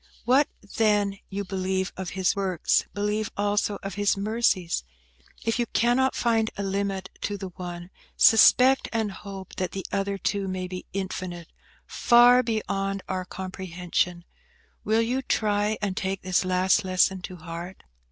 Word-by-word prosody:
What 265 +4 +4 0.3
then, 205 -3 +2
you 200 +1 -3
believe 190 0 -2
of 190 -1 -5
His 185 -1 +2
works, 190 -4 +1
believe 210 +1 -1
also 205 0 0
of 195 -1 -4
His 205 +1 +1
mercies. 200 -4 0 0.6
If 225 +1 0
you 240 - +1
cannot 245 +4 +2
find 225 -2 +1
a 200 - -2
limit 195 -1 -2
to 205 - -2
the 190 -1 -6
one, 175 0 -8 0.3
suspect 255 +4 +6
and 220 -3 -1
hope 195 -1 -9
that 185 - -2
the 190 -2 -5
other, 195 0 -1
too, 195 +1 -1
may 185 -1 -3
be 180 0 -7
infinite–far 195 +6 +2
beyond 195 -4 -2
our 185 -1 -3
comprehension. 180 -1 -3 0.6
Will 220 +1 +2
you 250 +3 -1
try 210 -3 0
and 195 -2 -1
take 190 0 -3
this 185 0 +1
last 185 0 +2
lesson 185 0 +2
to 185 - -7
heart?" 170 +2 -8
195 Hz, 145 wpm, -26 LUFS, 185-215 Hz, 0.6 s, suspect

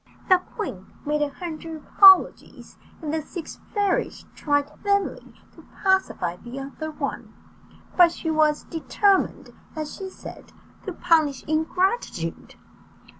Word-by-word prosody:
The 370 -1 +6
queen 365 - -7 0.2
made 300 +1 0
a 295 - +1
hundred 325 +1 -7
apologies, 380 +5 +5 0.3
and 305 -1 -3
the 320 - 0
six 330 +2 -8
fairies 405 -3 -1
tried 290 -1 0
vainly 400 -1 -1 0.2
to - - -16 0.2
pacify 380 - +1
the 240 +6 -10
other 275 +3 -6
one; 310 - -5 0.6
but 350 -2 +6
she 325 -1 -3
was 305 -1 +2
determined, 385 +4 0 0.2
as 310 -1 -5
she 385 -1 -6
said, - - -12 0.3
to 380 - -3
punish 315 -7 +2
ingratitude. 315 - -1
320 Hz, 125 wpm, -24 LUFS, 295-375 Hz, 0.6 s, The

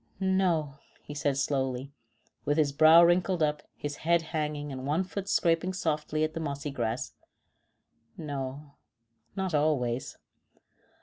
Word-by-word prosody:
"No," 180 -7 +1 0.2
he 145 - -8
said 145 -1 0
slowly, 135 -1 -1 0.5
with 145 - 0
his 150 -3 +3
brow 160 +4 +7
wrinkled 175 0 +3
up, 150 -1 0
his 145 -1 -5
head 170 +1 +2
hanging 150 -2 -2
and 130 0 -5
one 155 +6 +1
foot 195 +1 -6
scraping 170 +1 +2
softly 155 -3 -1
at 155 0 -1
the 165 - -4
mossy 145 -2 -4
grass. 120 -2 -3 1.0
"No, 140 -2 -6 0.6
not 190 -3 -2
always." 135 -5 0
150 Hz, 130 wpm, -29 LUFS, 140-165 Hz, 1.0 s, brow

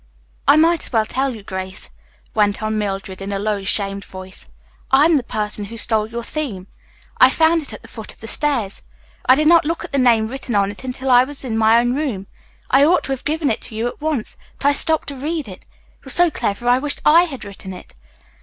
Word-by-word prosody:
"I - - +7
might 330 +1 +4
as - - -5
well 220 -3 +2
tell 265 +2 -2
you, 215 - -11
Grace," 190 0 -5 0.4
went 210 0 +1
on 215 0 -1
Mildred 195 -2 -4
in 195 +1 -5
a 200 - -1
low, 205 0 -2
shamed 200 0 0
voice. 185 - -11 0.4
"I 270 +3 +5
am 330 0 +4
the 280 - +2
person 210 -3 -3
who 230 +3 -9
stole 220 -1 +1
your 235 +1 -5
theme. 230 -11 -4 0.5
I 255 - +8
found 325 +3 +3
it 290 - -7
at - - -10
the - - -12
foot 220 -2 -9
of - - -20
the - - -10
stairs. 245 -8 0 0.5
I 255 - +7
did 305 +2 +2
not 335 0 +6
look 330 +3 -2
at - - -11
the 280 - +1
name 230 -3 +4
written 255 -1 -5
on 200 0 +2
it 205 - -12
until 260 +1 -3
I 245 0 +7
was 275 0 -4
in 230 -3 -3
my 225 +1 +5
own 245 +1 +1
room. 255 -9 -3 0.5
I 270 +2 +6
ought 345 +5 +4
to - - -5
have 265 - -4
given 310 -1 0
it 220 - -2
to 220 - -5
you 225 +2 -2
at 245 - -8
once, 300 -7 -2 0.2
but 280 - +2
I - - +5
stopped 315 +2 +1
to 285 - -6
read 300 +2 -3
it. 185 -2 -11 0.3
It - - -35
was - - +2
so 350 -1 +4
clever 225 0 -3
I 245 +1 +4
wished 290 +1 -2
I 335 +4 +6
had 270 -10 -8
written 200 -1 -9
it. 180 - -11
245 Hz, 245 wpm, -19 LUFS, 210-290 Hz, 0.5 s, I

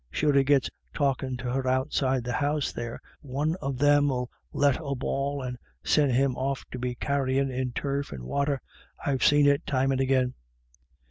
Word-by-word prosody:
Sure, 150 -1 +1
if - - 0
he 135 - +6
gets 140 -1 +3 0.3
talkin' 135 -3 0
to 125 0 -4
her 130 0 -1
outside 130 -1 +1
the 120 0 -3
house 145 +2 0
there, 120 0 -5 0.2
one 145 +3 -1
of 135 -2 -2
them 145 +1 +4
'ill 125 -2 -2 0.2
let 145 -2 +2
a 140 -2 -2
bawl 140 +2 -2
and 125 -1 -5 0.2
send 145 -3 +3
him 130 +1 +2
off 135 +1 -2
to 125 - -5
be 125 0 -2
carryin' 135 0 0
in 130 0 -2
turf 140 +2 -2
or - - -5
wather; 140 - 0 0.5
I've 135 -2 0
seen 145 0 +5
it 145 +3 +4
times 135 -1 +2
and 135 0 +1
agin." 130 -1 +2
135 Hz, 190 wpm, -27 LUFS, 130-140 Hz, 0.5 s, he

